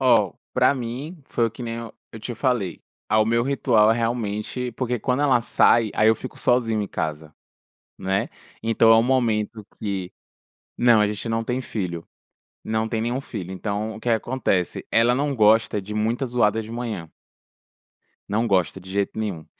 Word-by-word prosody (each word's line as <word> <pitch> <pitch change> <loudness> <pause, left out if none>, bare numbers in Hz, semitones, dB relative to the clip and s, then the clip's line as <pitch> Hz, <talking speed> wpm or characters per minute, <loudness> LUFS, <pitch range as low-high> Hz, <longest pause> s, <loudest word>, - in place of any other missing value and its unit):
Ó, 115 -8 +4 0.2
pra - - +4
mim, 135 +7 -6
foi 115 - +1
o - - -8
que 120 +3 -8
nem 115 -1 -4
eu 115 -1 -7 0.2
eu 115 - -9
te 120 +3 -5
falei, 115 - -1 0.3
ao 110 0 +4
meu 115 +1 +2
ritual, 120 -5 +3
realmente 115 +1 -2
porque 125 0 -1
quando 130 +2 0
ela 130 -5 +4
sai, 115 -1 +3
aí 110 - +3
eu 110 - +5
fico 130 - -9
sozinho 115 -3 +2
em 100 - -3
casa, 80 0 -4 0.7
né, 95 +1 -1 0.3
então 115 0 +4
é - - +7
o 115 - +5
momento 115 -4 0
que 95 -3 -4 0.7
Não 120 -2 +5
a 105 - +3
gente 105 +2 -4
não 115 0 0
tem 125 +2 -2
filho, 90 -8 -4 0.6
não 110 0 -1
tem 110 0 -1
nenhum 120 +4 -1
filho, 95 -9 -7
então 105 +3 -3
o - - -10
que 120 - -4
que 115 - +5
acontece, 110 -6 -1
ela 115 +2 +4
não 140 +1 0
gosta 110 -1 +4
de 105 +2 -7
muita 115 +5 0
zoada 110 -3 +2
de 110 - -10
manhã. 110 -9 -5 1.2
Não 110 +3 0
gosta 95 -1 +1
de 95 - -13
jeito 100 +2 -1
nenhum. 95 -8 -3
115 Hz, 180 wpm, -23 LUFS, 105-120 Hz, 1.2 s, é